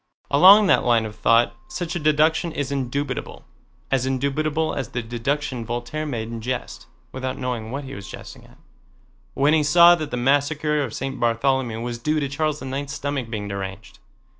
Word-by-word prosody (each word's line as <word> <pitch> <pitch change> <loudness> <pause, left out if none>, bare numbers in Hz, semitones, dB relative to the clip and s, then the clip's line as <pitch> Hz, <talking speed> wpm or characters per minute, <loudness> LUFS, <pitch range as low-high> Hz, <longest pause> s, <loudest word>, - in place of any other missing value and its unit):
Along 195 +8 +8
that - - +4
line 115 -2 +3
of 105 -1 -7
thought 115 +1 +3
such 175 0 -4
a - - -1
deduction 155 +2 +2
is 145 -2 -3
indubitable, 140 +1 -3 0.5
as 130 -1 +1
indubitable 145 +4 -1
as 130 -4 -4
the 125 - -4
deduction 125 +2 -2
Voltaire 120 +7 -4
made 115 -5 -4
in 115 -1 -6
jest 125 +2 -5 0.2
(without 130 0 -4
knowing 125 -4 -4
what 140 +4 -4
he 135 0 -8
was 100 -6 -9
jesting - - -10
at) - - -20 0.8
when 145 +3 +3
he 160 - +4
saw 170 +4 +7
that 155 -4 -2
the 125 - -3
Massacre 145 +4 +1
of - - -5
St. 135 0 -4
Bartholomew 120 0 0
was 120 0 -4
due 155 +5 0
to 140 - -1
Charles 150 +1 -2
IX's 135 +2 -4
stomach 140 -4 -3
being 105 -3 -4
deranged. 100 +1 -7
135 Hz, 180 wpm, -23 LUFS, 120-150 Hz, 0.8 s, Along